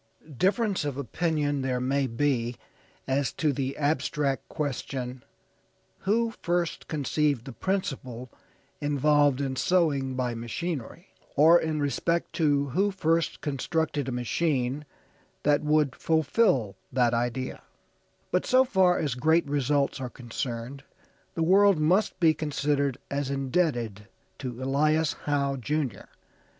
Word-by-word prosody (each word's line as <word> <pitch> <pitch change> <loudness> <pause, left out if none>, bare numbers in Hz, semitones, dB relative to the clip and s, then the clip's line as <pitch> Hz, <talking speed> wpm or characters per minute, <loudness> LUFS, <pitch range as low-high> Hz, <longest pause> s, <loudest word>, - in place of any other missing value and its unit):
Difference 200 - +1
of 145 -3 -3
opinion 145 +1 -1
there 130 -1 -1
may 135 +2 +1
be 120 -1 0 0.5
as 135 -2 +1
to 150 -3 +1
the 135 0 -3
abstract 145 -1 0
question, 130 -3 -4 0.8
who 230 +3 +1
first 175 -1 -1
conceived 145 -3 0
the 135 - -7
principle 130 - -3 0.5
involved 145 -1 +3
in 135 -2 -2
sewing 140 -5 +1
by 125 -2 -1
machinery, 140 - -5 0.3
or 165 +4 +6
in 155 -1 -1
respect 165 +4 -1
to 145 -4 +2
who 195 +10 +2
first 165 -4 0
constructed 145 0 -1
a - - -3
machine 130 +2 -1 0.6
that 145 0 +3
would 150 -2 +2
fulfill 155 - +2 0.2
that 125 -2 +2
idea; 120 +2 -2 0.7
but 180 - +2
so 260 +1 +4
far 185 -6 +3
as 145 -5 -1
great 160 +7 +2
results 140 0 0
are 125 - -3
concerned 120 +2 -5 0.5
the 165 - 0
world 195 +2 +5
must 185 +6 +2
be 165 -3 +5
considered 145 -3 -1
as 140 -1 -1
indebted 130 - -1 0.3
to 125 -1 -5
Elias 150 +3 +2
Howe, 140 -2 0
Jr. 140 -2 -3
145 Hz, 120 wpm, -27 LUFS, 130-160 Hz, 0.8 s, or